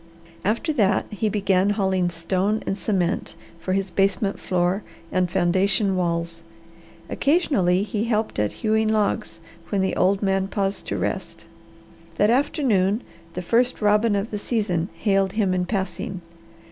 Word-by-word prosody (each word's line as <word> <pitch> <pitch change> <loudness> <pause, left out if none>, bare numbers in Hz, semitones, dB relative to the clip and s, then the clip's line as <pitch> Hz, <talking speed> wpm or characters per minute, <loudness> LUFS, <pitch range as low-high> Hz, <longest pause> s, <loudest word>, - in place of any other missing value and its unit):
After 230 - 0
that 205 -7 +2
he 215 +1 -1
began 195 -1 +2
hauling 190 -3 +1
stone 185 +5 -1
and - - -1
cement 185 -2 -1 0.2
for 185 +3 -2
his 195 0 -1
basement 195 +1 +1
floor 180 +2 0 0.3
and 185 -1 +1
foundation 190 +3 +2
walls. 170 -2 -1 0.7
Occasionally 215 - +2
he 210 +1 -2
helped 220 - -1
at 105 -1 +1
hewing 220 0 +3
logs 210 -5 0 0.3
when 200 -2 +1
the 190 - 0
old 195 +2 +2
man 195 -1 +1
paused 195 0 -2
to - - -2
rest. - - -4 0.7
That 210 +2 +3
afternoon 235 - +2 0.3
the 180 - -3
first 240 +7 +2
robin 210 +1 +3
of 200 +3 -2
the 210 - -3
season 200 -6 -1
hailed 195 -2 +1
him 205 -4 +1
in 180 -1 0
passing. 190 0 -3
195 Hz, 145 wpm, -23 LUFS, 185-215 Hz, 0.7 s, hewing